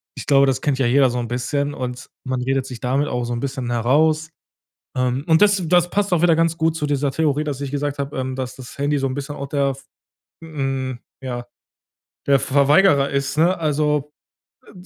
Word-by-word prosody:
ich - - -7
glaube, 140 -1 +5
das 135 -1 0
kennt 140 -3 0
ja 130 - +2
jeder 130 +1 +4
so 125 - -3
'n 120 - -3
bisschen 140 +4 -2
und 125 -2 -6
man 130 -1 -2
redet 135 +1 0
sich 125 -3 -8
damit 135 +4 0
auch 125 0 -2
so 120 - -3
'n 120 - -3
bisschen 130 -3 -3
heraus, 155 +7 +2 0.7
ähm, 125 +2 0
und 160 +1 +4
das 205 -2 +4
das 175 0 +3
passt 205 -1 0
auch 175 - +2
wieder 170 -2 +5
ganz 165 0 +1
gut 160 0 +1
zu 150 - -2
dieser 145 -1 0
Theorie, 150 0 0
dass 145 -3 -4
ich 140 -1 -4
gesagt 145 0 -2
habe, 140 +2 -4
ähm, 130 0 -3
dass 130 -1 -4
das 130 -1 -12
Handy 145 +1 +1
so 135 0 0
'n 130 - -4
bisschen 145 +1 -5
auch 140 -1 -6
der, 140 -1 0 0.7
hm, 135 -5 -3 0.2
ja 120 -2 -4 0.8
der 140 -1 +5
Verweigerer 140 +2 +4
ist, 140 +1 -2
ne? 175 +4 +4
Also, 150 -2 0 0.6
äh, - - -14
140 Hz, 210 wpm, -21 LUFS, 130-150 Hz, 0.8 s, glaube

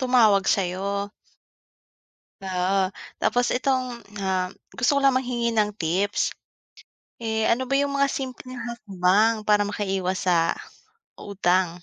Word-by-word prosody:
tumawag 225 -7 +4
sa'yo. 200 +2 -1 1.3
Oo. 190 0 0 0.3
Tapos 245 0 +1
itong, 255 -2 0 0.2
ah, 185 -1 0 0.2
gusto 250 +4 +1
ko - - +3
lang 275 - +6
manghingi 240 -2 0
ng 210 -2 +1
tips. 190 +3 0 0.9
Eh, 220 -1 0
ano 245 +3 +2
ba 275 +2 +1
yung 285 0 0
mga 275 -1 +2
simpleng 255 -1 -6
hakbang 215 -1 +1
para 210 -1 +4
makaiwas 190 -2 -2
sa 165 -2 +3 0.7
utang? 180 -3 0
210 Hz, 115 wpm, -24 LUFS, 190-245 Hz, 1.3 s, lang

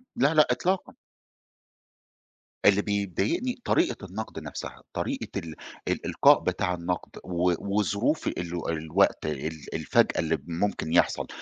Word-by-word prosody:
لا، 140 +5 +3
لا، 155 -1 +6
إطلاقًا. 185 +1 0 1.7
اللي 100 0 +6
بيضايقني 100 - -1
طريقة 335 - +1
النقد 100 -2 -6
نفسها، 75 -2 -7
طريقة - - -2
ال 80 -2 -8 0.3
الإلقاء - - +4
بتاع 90 -1 0
النقد، 90 +1 -3
و 90 0 +1
وظروف 100 -3 0
ال 85 -1 -3
الوقت 80 +4 +1
ال 75 +1 -4
الفجأة - - +2
اللي 80 0 +1
ممكن 85 -1 -1
يحصل، - - +3
90 Hz, 115 wpm, -27 LUFS, 80-105 Hz, 1.7 s, لا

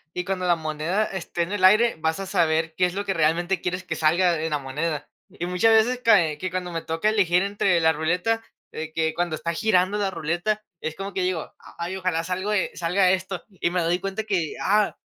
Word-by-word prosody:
y 180 - -1
cuando 185 -1 -2
la 175 - +4
moneda 160 +6 -1
esté 180 -3 -3
en 170 - -6
el 205 -2 -2
aire, 215 +2 +5
vas 160 +3 -1
a 195 - -4
saber 165 -4 +1
qué 180 -1 +3
es 180 - -7
lo 200 - -2
que 195 - 0
realmente 175 +3 +1
quieres 180 +1 -3
que 165 -3 -4
salga 170 +2 +2
en 160 - -1
la 150 - 0
moneda". 145 +2 -3 0.2
Y 175 - -6
muchas 180 +5 +3
veces 230 +3 +4
que 175 -6 +3
cuando 180 0 -4
me 165 -1 -3
toca 165 +6 -2
elegir 185 -4 +3
entre 200 -3 +1
la 160 0 +4
ruleta, 180 +9 0 0.3
eh, 160 0 -6
que 160 -1 0
cuando 170 -1 -1
está 170 +2 -3
girando 195 +1 +2
la 200 -2 +1
ruleta, 175 +6 -2 0.2
es 160 0 -4
como 195 0 -6
que 190 - -1
digo: 180 -3 -2 0.2
"Ay, 170 +2 -4
ojalá 180 -3 -1
salga 185 +3 -3
o - - +1
e 205 - 0
salga 180 +2 +2
esto", 190 0 -2
y 190 -3 -2
me 180 0 0
doy 170 +2 +1
cuenta 195 +3 -3
que, 185 -7 -1
ah, 210 +1 +2
180 Hz, 225 wpm, -24 LUFS, 165-195 Hz, 0.3 s, aire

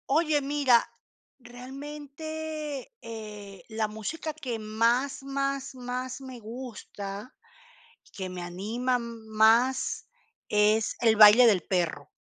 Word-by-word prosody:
Oye, 305 0 +3
mira, 275 -4 +3 0.5
realmente, 290 - -7
eh, 210 -4 -9
la 220 -1 -1
música 220 +10 -5
que 255 -7 -4
más, 230 +6 +1
más, 275 0 -2
más 255 +1 -5
me 260 -2 -9
gusta, 215 -2 -7 0.8
que 190 -2 -5
me 180 -1 -6
anima 215 +9 -1
más, 230 +2 +2 0.4
es 210 +1 +3
el 225 -2 +5
baile 215 +3 +9
del 200 -5 +4
perro. 170 -6 -1
240 Hz, 105 wpm, -28 LUFS, 215-275 Hz, 0.8 s, baile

